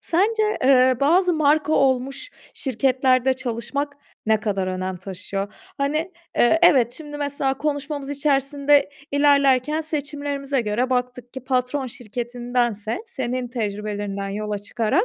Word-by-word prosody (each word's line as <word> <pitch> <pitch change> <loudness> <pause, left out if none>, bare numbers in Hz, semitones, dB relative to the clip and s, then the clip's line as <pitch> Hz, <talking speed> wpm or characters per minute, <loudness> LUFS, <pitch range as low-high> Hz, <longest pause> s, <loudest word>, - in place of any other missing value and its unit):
sence, 425 +6 +1 0.2
eee, 255 -1 +5
bazı 350 +6 +4
marka 310 -1 +2
olmuş 270 - +1 0.2
şirketlerde 260 0 +2
çalışmak 260 +3 -3 0.3
ne 220 -1 +3
kadar 195 -3 -1
önem 185 0 -3
taşıyor? 195 +2 -5 0.3
Hani, 305 +6 -1 0.2
eee, 240 +7 +4
evet, 255 -8 +5
şimdi, 295 +2 -8
mesela, 285 -2 -1
konuşmamız 285 -1 -3
içerisinde 280 0 +2 0.2
ilerlerken 285 0 +3
seçimlerimize 285 -3 -2
göre 230 +4 -1
baktık 250 -1 -2
ki 260 - -6
patron 260 +1 0
şirketindense 240 - -3
senin 250 - -3
tecrübelerinden 205 -3 -3
yola 210 +1 -3
çıkarak, 220 - 0
260 Hz, 115 wpm, -23 LUFS, 235-285 Hz, 0.3 s, eee